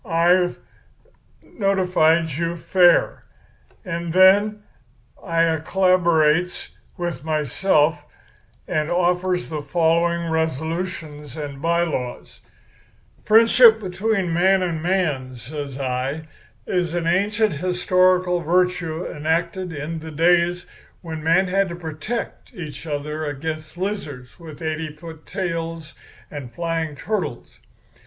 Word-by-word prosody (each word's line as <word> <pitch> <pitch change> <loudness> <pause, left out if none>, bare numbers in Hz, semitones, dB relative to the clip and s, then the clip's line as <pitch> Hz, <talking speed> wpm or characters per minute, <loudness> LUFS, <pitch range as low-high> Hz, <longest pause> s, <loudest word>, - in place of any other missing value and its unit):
I've 175 -1 +2 0.9
notified 180 -5 +2
you 165 +3 -2
fair.' 175 +1 +3 0.6
"And 170 -2 -4
then 205 +3 +5 0.6
I 165 -3 +1
collaborates 175 -1 +2 0.3
with 175 -6 -4
myself, 155 0 +1 0.6
and 155 0 -1
offers 180 +1 0
the 155 -2 -4
following 170 +1 +1
resolutions 160 -2 -3
and 145 -2 -6
by 170 +1 +2
laws: 125 -7 -5 0.9
"'Friendship 225 +1 +6
between 190 -2 -1
man 190 +2 +3
and 165 -3 -2
man,' 155 -8 -1
says 140 +2 -7
I, 135 +4 -3 0.4
'is 175 -2 -1
an 170 -1 -1
ancient 205 +4 +1
historical 180 +2 +2
virtue 175 0 0
enacted 170 +4 -2
in 160 +2 -5
the 160 +1 -8
days 175 +3 +2 0.4
when 160 -2 -6
men 170 +4 +3
had 195 +1 +1
to 170 - -5
protect 165 +7 -6
each 160 -4 -8
other 150 +1 -3
against 155 +2 -5
lizards 165 -11 -5
with 165 -1 -10
eighty 155 0 -3
foot 160 +1 -12
tails 165 -4 -4 0.4
and 140 -5 -7
flying 165 -2 -3
turtles. 215 +8 -4
170 Hz, 105 wpm, -22 LUFS, 155-180 Hz, 0.9 s, Friendship